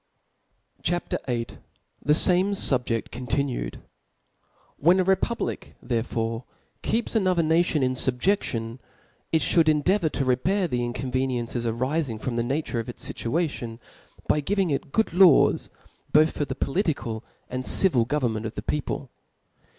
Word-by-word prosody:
CHAP. 175 +1 -1 0.2
VIll. 120 -2 -1 0.6
Thefdme 180 +6 +4
SubjeSi 125 - +1
contintie^. 130 +2 -2 1.0
WHEN 175 +6 +4
a 185 - +2
rppublic 195 +5 -1
therefore 115 -1 -2 0.4
ke^ps 230 +1 -1
another 185 -5 +2
nation 160 -2 +2
in 130 0 +1
fubjeftion, 125 - -1 0.5
it 160 - +2
Ihould' 165 -2 +4
endeavour 160 +4 +2
to 135 - -2
repair 175 +10 +1
the 125 -6 -1
inconveniericies* 120 -1 -2
arifing 130 0 -1
from 120 +1 -3
the 120 - +1
naf 135 +6 -1
ture 120 - -2
of 115 - -5
it$ 120 - -8
Tituation, 120 -4 -2 0.5
by 150 - +3
giving 190 +3 0
it 140 0 -2
good 220 - +2
law§ 180 -4 +5 0.4
both 155 +1 +5
for 145 - -1
the 130 -1 -5
political 135 - -1 0.3
'anc^' 130 0 -3
civil 140 -12 +4
government 115 -4 -1
of 110 - -9
the - - -5
people. 140 -3 -3
140 Hz, 135 wpm, -25 LUFS, 120-170 Hz, 1.0 s, law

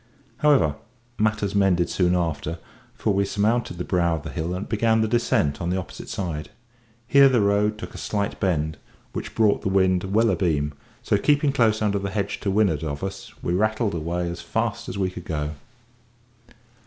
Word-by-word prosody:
However, 110 - +3 0.4
matters 105 -2 +1
mended 95 -4 +3
soon 90 -1 +1
after, 85 -1 -2 0.4
for 105 - 0
we 100 +1 +2
surmounted 105 0 0
the 90 - -3
brow 85 -2 +1
of 80 - -6
the 80 - -6
hill, 85 +1 -3
and 95 - -5
began 110 0 +2
the 110 - +2
descent 110 -11 +1
on 85 - -1
the 90 - 0
opposite 95 - -7
side; 85 -5 -4 0.6
here 140 +2 +6
the 125 -2 +3
road 105 +1 +2
took 110 - -8
a - - -8
slight 100 -1 -2
bend, 80 -5 0 0.4
which - - -5
brought 105 -2 +3
the - - -1
wind 95 -1 +2
well 110 +4 +3
abeam; 75 -6 0 0.3
so 105 - +2
keeping 145 +2 +3
close 110 -5 +2
under 100 -1 +1
the 100 0 -3
hedge 100 +1 -2
to 100 - -2
windward 95 -7 +2
of 70 0 -4
us, 95 0 -5
we 85 - 0
rattled 110 +2 +1
away 85 +2 -2
as 85 0 -5
fast 115 +5 -2
as 95 - -5
we 95 -2 0
could 90 -1 -9
go. 75 -2 -2
95 Hz, 190 wpm, -24 LUFS, 85-110 Hz, 0.6 s, here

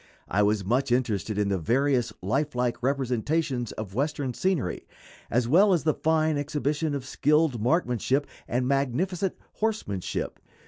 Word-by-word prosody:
I 100 - +1
was 105 -1 +2
much 125 +5 +1
interested 110 -5 0
in 105 -1 +1
the 95 -2 0
various 125 - +1
lifelike 125 +1 0
representations 130 0 0
of 105 -3 -6
Western 140 +1 -1
scenery, 155 - -1 0.4
as 120 +1 +1
well 190 - +5
as 170 - +1
the 155 0 +3
fine 155 -1 +1
exhibition 150 +1 -1
of 135 -2 -4
skilled 150 -3 +2
marksmanship 135 0 +1 0.2
and 125 +1 0
magnificent 155 +8 0 0.2
horsemanship. 210 - -2
135 Hz, 135 wpm, -27 LUFS, 120-155 Hz, 0.4 s, well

